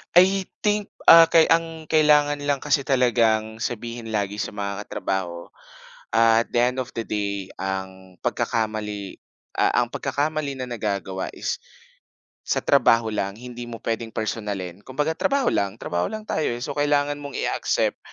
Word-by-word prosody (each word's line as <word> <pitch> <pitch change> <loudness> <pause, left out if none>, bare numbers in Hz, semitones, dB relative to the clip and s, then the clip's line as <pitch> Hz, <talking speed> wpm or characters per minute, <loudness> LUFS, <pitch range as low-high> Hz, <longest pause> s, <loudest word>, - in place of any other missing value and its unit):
I 190 +2 +5 0.2
think, 210 -1 0 0.2
ah, 165 0 +11
‘kay 165 0 +4
ang 165 -1 0
kailangan 150 -1 +4
lang 145 -1 0
kasi 140 -2 +1
talagang 115 -4 +2
sabihin 115 0 -5
lagi 105 -1 -1
sa - - -3
mga 100 0 -4
katrabaho, 85 -3 -3 0.6
at 115 0 +5
the 120 - +3
end 125 +1 +1
of 125 - -8
the - - 0
day, 100 -2 -3
ang 95 -1 -5
pagkakamali, 105 -3 -2 0.4
ah, - - +3
ang - - -7
pagkakamali 145 -1 -2
na 125 - -5
nagagawa 100 -5 -3
is - - -3 0.9
sa - - 0
trabaho 115 -1 +4
lang, 100 -2 -2
hindi 120 0 -8
mo 115 -2 -8
pwedeng 115 0 -3
personalin. 100 -5 -3
Kumbaga, 150 +5 -1
trabaho 275 -2 +2
lang, 100 0 0
trabaho 85 -4 -1
lang 215 0 -5
tayo, 155 - -1
eh. 120 - -7
So, 140 +1 -4
kailangan 145 0 +1
mong 140 -2 -7
i-accept - - 0
115 Hz, 150 wpm, -24 LUFS, 105-145 Hz, 0.9 s, ah